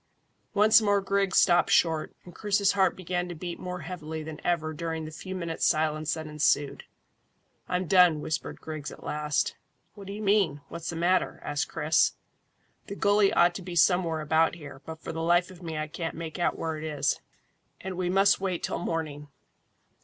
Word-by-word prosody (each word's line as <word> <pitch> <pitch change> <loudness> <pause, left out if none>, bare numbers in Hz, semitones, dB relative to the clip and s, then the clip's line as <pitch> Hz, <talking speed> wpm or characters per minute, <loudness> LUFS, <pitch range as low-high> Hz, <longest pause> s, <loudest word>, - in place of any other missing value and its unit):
Once 215 +2 +6
more 205 -1 +3
Griggs 195 -1 0
stopped 175 0 +5
short, 160 -2 +2
and 175 - -12
Chris's 200 -2 +2
heart 190 -1 +2
began 180 -1 -3
to 175 - -6
beat 175 +1 -6
more 180 -1 -5
heavily 160 -3 -6
than 155 0 -8
ever 160 -3 0
during 160 0 -4
the 155 - -7
few 185 +4 -7
minutes' 170 -3 -4
silence 155 0 +1
that 160 -1 -6
ensued. 150 -2 0 0.8
"I'm 180 +1 0
done," 180 -3 +5
whispered 155 - -4
Griggs 155 -2 -6
at - - -12
last. 150 0 -1 0.4
"What 200 -2 -11
do 200 - -5
you 215 +1 -6
mean? 195 -8 +2
What's 170 -1 -6
the 170 - -4
matter?" 175 +3 +1
asked 145 -1 -2
Chris. 155 +1 +2 0.7
"The 200 - -6
gully 205 0 +3
ought 175 0 +4
to 190 - -6
be 180 -1 -7
somewhere 170 -2 +3
about 160 +2 +2
here, 145 -4 -11
but 160 0 -7
for - - -7
the 165 - -4
life 175 +2 +2
of 180 -1 -14
me 165 -3 -5
I 155 - -1
can't 165 +2 -5
make 165 +1 -6
out 175 - +1
where 160 -1 -3
it 155 - -7
is, 145 -3 -1 0.6
and 190 0 -6
we 180 0 -1
must 195 +1 +4
wait 185 -3 -2
till - - -2
morning." 155 -4 -4
170 Hz, 190 wpm, -27 LUFS, 155-185 Hz, 0.8 s, Once